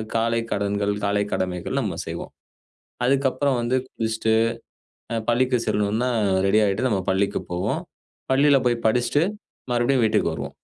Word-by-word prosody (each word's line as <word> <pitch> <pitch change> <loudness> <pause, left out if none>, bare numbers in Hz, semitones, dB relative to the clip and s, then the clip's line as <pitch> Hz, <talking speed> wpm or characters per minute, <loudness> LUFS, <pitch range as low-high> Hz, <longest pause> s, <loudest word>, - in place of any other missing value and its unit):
காலைக் 115 0 0
கடன்கள் 100 0 0
காலை 100 0 +1
கடமைகள் 90 -2 -2
நம்ம - - -3
செய்வோம். - - -6 0.8
அதுக்கப்புறம் 135 0 +1
வந்து 120 +2 +1
குளிச்சுட்டு, 110 -1 -1 0.8
அ - - 0
பள்ளிக்கு 125 +1 +2
செல்லணுனா, 105 +3 +1 0.4
ரெடி 105 +2 +4
ஆயிட்டு, 100 +6 +1
நம்ம 100 -4 0
பள்ளிக்கு 100 +2 0
போவோம். 90 +1 -1 0.5
பள்ளில 140 +1 +5
போய் 120 -1 0
படிச்சிட்டு, 125 +6 +2 0.5
மறுபடியும் 120 +1 +2
வீட்டுக்கு 110 - +1
வருவோம். - - -6
115 Hz, 130 wpm, -23 LUFS, 100-125 Hz, 0.8 s, பள்ளில